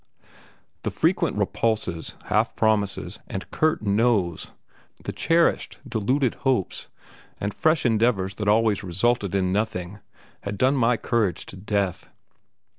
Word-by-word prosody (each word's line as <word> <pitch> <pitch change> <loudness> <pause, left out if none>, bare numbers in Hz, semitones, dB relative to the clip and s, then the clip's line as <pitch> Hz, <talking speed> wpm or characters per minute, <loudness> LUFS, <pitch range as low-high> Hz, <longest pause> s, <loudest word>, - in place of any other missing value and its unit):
The - - -2
frequent - - +1
repulses, 105 -8 -1
half 110 +3 +1
promises, 105 -3 0
and 95 -3 -5
curt 155 -6 +1
noes, 100 -5 +1 0.5
the - - -3
cherished, 165 0 +1
deluded 125 +4 +1
hopes, 130 -9 0 0.5
and 105 0 -2
fresh 155 -2 +2
endeavours 110 -4 +2
that 105 - -1
always 110 -1 +3
resulted 100 +2 0
in 95 -1 +1
nothing 100 -2 -2 0.4
had 100 0 -5
done 130 +6 +3
my 125 -2 +3
courage 110 -4 0
to - - -9
death. 100 -2 -2
105 Hz, 120 wpm, -24 LUFS, 95-120 Hz, 0.5 s, always